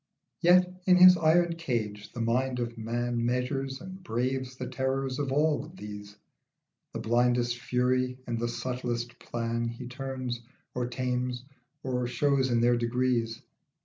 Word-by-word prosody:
Yet 180 +1 +4
in 180 - +7
his 180 0 +9
iron 170 +1 +3
cage 110 -9 -3
the 120 - -5
mind 125 +3 +1
of 120 -1 -3
man 120 +1 -2
Measures 130 +2 -1
and 185 +1 -9
braves 130 -3 -2
the - - -5
terrors 130 +1 -1
of 140 -2 -1
all 150 +2 +1
these. 105 - -9 0.8
The - - -3
blindest 120 +1 +2
fury 125 0 0
and 115 -1 -2
the 120 - 0
subtlest 120 -1 -3
plan 115 0 -2
He 120 +2 -6
turns, 130 -1 -4 0.3
or 125 -1 -1
tames, 125 0 -2 0.4
or 125 -2 -1
shows 135 +1 +2
in 120 -1 +2
their 120 0 +4
degrees. 120 -1 0
125 Hz, 145 wpm, -29 LUFS, 120-135 Hz, 0.8 s, his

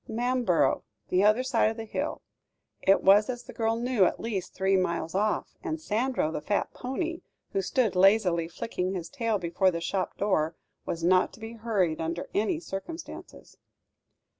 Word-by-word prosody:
"Manborough 240 -5 +1 0.3
the 185 +2 +3
other 215 +4 +4
side 240 -4 +2
of 225 - -5
the 225 - -5
hill." 215 - -3 0.6
It 195 - +4
was, 205 +3 +6
as 245 -1 -4
the - - -11
girl 225 0 0
knew, 240 -3 +2
at - - 0
least 200 -6 -4
three 190 0 +2
miles 170 -3 0
off, 210 +2 0
and 320 0 -3
Sandro, 240 - 0
the 155 - -4
fat 205 +4 -1
pony 330 +7 -3 0.3
who 395 - +1
stood 255 - +1
lazily 180 -3 +4
flicking 185 +1 -3
his 170 -2 -5
tail 230 -6 0
before 180 +1 +1
the 170 -2 -2
shop 185 +3 -2
door, 170 -6 +1 0.3
was 165 0 -3
not 185 +2 +4
to - - -14
be 225 +1 -7
hurried 205 -9 0
under 165 +2 -3
any 220 - +1
circumstances. 325 - -8
210 Hz, 170 wpm, -28 LUFS, 180-235 Hz, 0.6 s, was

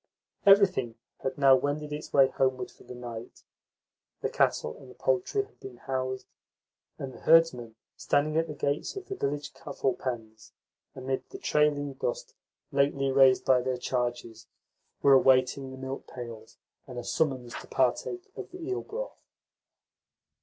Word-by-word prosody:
Everything 190 - +5 0.2
had 135 - -3
now 135 -2 +7
wended 145 +3 -2
its 150 +1 -6
way 135 -1 +6
homeward 130 -1 0
for - - -19
the 125 - -10
night; 120 -2 -8 0.8
the - - 0
cattle 75 - +1
and 130 -2 -14
poultry 185 - +1
had 425 +2 -21
been 395 0 -10
housed, 130 -1 -3 0.7
and 135 -1 -6
the - - -12
herdsmen, 130 -9 +4 0.2
standing 150 +2 +1
at 165 +1 +2
the 150 - -6
gates 145 - -1
of 390 -1 -6
the 390 - -3
village 145 - -3
cattle 140 -3 -2
pens, 110 -4 -6 0.4
amid 130 0 -3
the 390 - -8
trailing 150 - +1
dust 125 -2 -4 0.4
lately 140 -1 +2
raised 135 -1 +5
by 130 -1 +5
their 130 0 -1
charges, 120 -3 -3 0.6
were 140 - +7
awaiting 130 0 +4
the 130 - -9
milk 130 +1 -6
pails 115 -3 -9 0.3
and 125 -2 -8
a 120 - -4
summons 130 -4 -1
to - - -13
partake 135 - 0
of - - -7
the 365 - -10
eel 380 +3 -3
broth. - - -6
135 Hz, 155 wpm, -29 LUFS, 125-150 Hz, 0.8 s, now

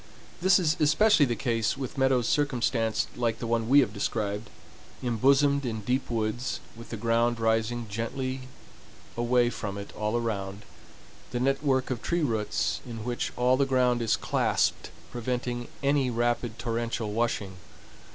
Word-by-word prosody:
This 185 +1 +6
is 170 -3 +1
especially 155 +1 +5
the 120 - -1
case 115 -1 0
with 135 0 -5
meadows 130 -3 +2
circumstanced 120 -6 0
like 115 -2 0
the 120 - -5
one 115 0 0
we 140 +2 +7
have 110 -6 -1
described—embosomed 120 +6 0
in 110 -4 -3
deep 125 +6 -1
woods, 115 +2 -2 0.2
with 115 +1 -11
the 115 - -5
ground 115 +1 +1
rising 115 +1 0
gently 130 +5 -4 0.7
away 120 0 +2
from 100 -4 -5
it 100 - -8
all 105 +2 -1
around, 100 -4 -3 0.7
the 120 - -3
network 135 0 +1
of 120 -4 -2
tree 175 -1 0
roots 110 -6 -1
in 115 -3 -7
which 120 0 -2
all 125 +1 +3
the 140 0 +2
ground 125 -2 +2
is 115 - +2
clasped - - 0 0.2
preventing 120 0 -3 0.2
any 140 -2 +2
rapid 120 -1 -1
torrential 115 -2 -2
washing. 105 -4 -1
120 Hz, 145 wpm, -28 LUFS, 115-130 Hz, 0.7 s, we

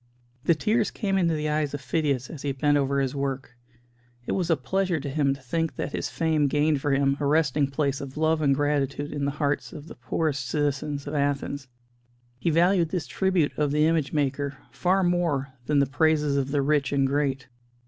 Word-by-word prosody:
The 170 - +4
tears 215 +6 +1
came 195 -2 -2
into 170 -4 +2
the 150 0 -2
eyes 150 -1 0
of - - -5
Phidias 135 -1 -1
as 150 - -8
he 140 -1 -2
bent 145 +2 +2
over 140 -1 +1
his 135 -2 0
work; 135 -3 -3 0.7
it - - -3
was 180 -3 -1
a 165 - +3
pleasure 185 +5 0
to 140 - -5
him 140 -1 +1
to 135 - -15
think 165 +5 -2
that - - -3
his - - -3
fame 160 -3 +1
gained 145 0 +1
for 145 - 0
him 140 0 +2
a 145 - -1
resting 150 -2 +2
place 140 -1 -1
of 140 0 -8
love 160 0 +2
and 140 -2 +3
gratitude 145 0 -1
in 145 -1 -2
the - - +1
hearts 145 -1 -1
of 150 +1 -10
the - - -9
poorest 145 -5 -2
citizens 145 +1 -1
of 145 - -5
Athens. 140 -1 -1 0.7
He 170 - 0
valued 170 +1 +3
this 180 -1 -2
tribute 185 -6 0
of 150 -1 +2
the 150 +1 +3
image 160 -4 +1
maker 140 -1 -1
far 190 +2 +1
more 165 -7 0
than 150 - +2
the 140 - +5
praises 150 +1 +2
of 140 -1 0
the 140 -1 +1
rich 140 -1 +1
and 140 -1 +2
great. 135 -2 -1
145 Hz, 210 wpm, -26 LUFS, 140-160 Hz, 0.7 s, the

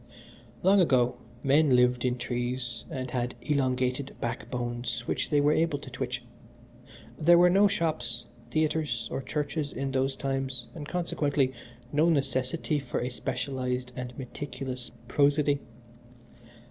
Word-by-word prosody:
"Long 195 +2 +6
ago 125 -7 +3 0.3
men 140 0 +5
lived 125 0 +3
in 125 0 +1
trees 120 -1 -2
and 130 -2 -4
had 125 -1 -1
elongated 130 -2 0
backbones 120 0 -3
which - - -1
they 145 - +4
were 145 +1 +4
able 160 -1 +2
to 140 - -10
twitch. - - -3 1.0
There 170 +2 +7
were 175 +1 +6
no 200 +2 +6
shops, 155 -10 -1 0.2
theatres, 155 -1 0
or - - -2
churches 145 +1 -2
in 135 0 -3
those 135 0 +1
times, 135 -2 -2
and, 150 -3 -7
consequently, 145 -6 +1 0.4
no 155 +3 +4
necessity 135 +1 0
for 140 - -3
a 125 - -1
specialized 125 0 -3
and 125 -1 -6
meticulous 130 -1 -5 0.2
prosody. 145 +1 +3
135 Hz, 130 wpm, -29 LUFS, 125-150 Hz, 1.0 s, There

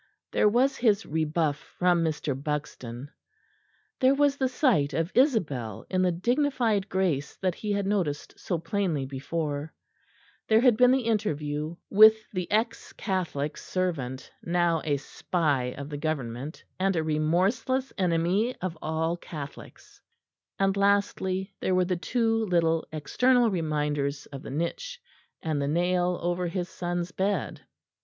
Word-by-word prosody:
There 210 - +4
was 260 +5 +2
his 220 -3 +2
rebuff 155 -1 0 0.2
from 175 -2 +3
Mr. 155 -2 -1
Buxton; 140 -2 -5 0.9
there 265 +1 +5
was 285 0 +3
the 265 -2 0
sight 205 - +2
of 165 +2 -1
Isabel 155 - +1
in 185 -1 +2
the 180 -1 +3
dignified 235 - +1
grace 175 -7 0
that 185 -2 -1
he 210 +4 -4
had 200 -1 0
noticed 185 -8 -1
so 175 - -2
plainly 165 -4 -1
before; 145 +2 -3 0.8
there 220 +1 +5
had 250 -3 +5
been 250 +2 +6
the 260 0 +3
interview 155 -8 -1 0.2
with 215 +2 +9 0.2
the 180 -3 -3
ex 220 +2 -1
Catholic 170 -7 -2
servant, 140 -9 -3
now 170 -2 +1
a 145 -2 +1
spy 145 -2 -1
of 140 0 -6
the 145 - -5
Government, 145 -2 -4 0.2
and 190 0 +2
a 160 - +1
remorseless 185 - +1
enemy 185 +6 +1
of 180 -2 -4
all 160 +2 -1
Catholics; 150 -5 -10 0.6
and 195 0 +2
lastly 200 -1 +1
there 185 - +1
were 185 0 +3
the 180 0 0
two 225 +5 0
little 165 -3 +1
external 240 - +2
reminders 150 -4 -1
of 140 -2 -9
the - - -8
niche 170 - -3 0.4
and 155 -3 -1
the 140 - 0
nail 175 +3 +1
over 175 +1 0
his 180 0 -3
son's 175 0 -3
bed. 195 +2 -1
175 Hz, 140 wpm, -27 LUFS, 150-205 Hz, 0.9 s, with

